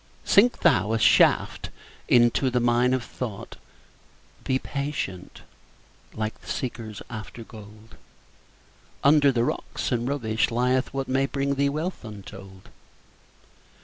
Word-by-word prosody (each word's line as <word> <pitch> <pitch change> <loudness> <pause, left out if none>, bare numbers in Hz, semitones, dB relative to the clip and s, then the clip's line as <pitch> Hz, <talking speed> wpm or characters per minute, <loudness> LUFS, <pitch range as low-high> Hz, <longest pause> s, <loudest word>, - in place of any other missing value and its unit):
Sink 235 +5 +4
thou 110 - +3
a - - +2
shaft - - +3 0.4
into 120 +2 +4
the 125 0 +1
mine 120 +1 +2
of 130 - -3
thought; 115 -6 -7 0.9
Be 130 - +1
patient, 140 -11 -5 0.7
like 110 0 -4
the - - -17
seekers 115 -5 -5
after 115 0 -8
gold; 110 0 -14 1.1
Under 145 0 +5
the 120 -2 +1
rocks - - -3
and 120 -1 0
rubbish 110 -6 0
lieth 125 +2 0
what 135 -1 -3
May 135 +1 +1
bring 140 0 -1
thee 140 0 +1
wealth 155 +5 -4
untold. 95 -3 -11
120 Hz, 120 wpm, -25 LUFS, 110-135 Hz, 1.1 s, Under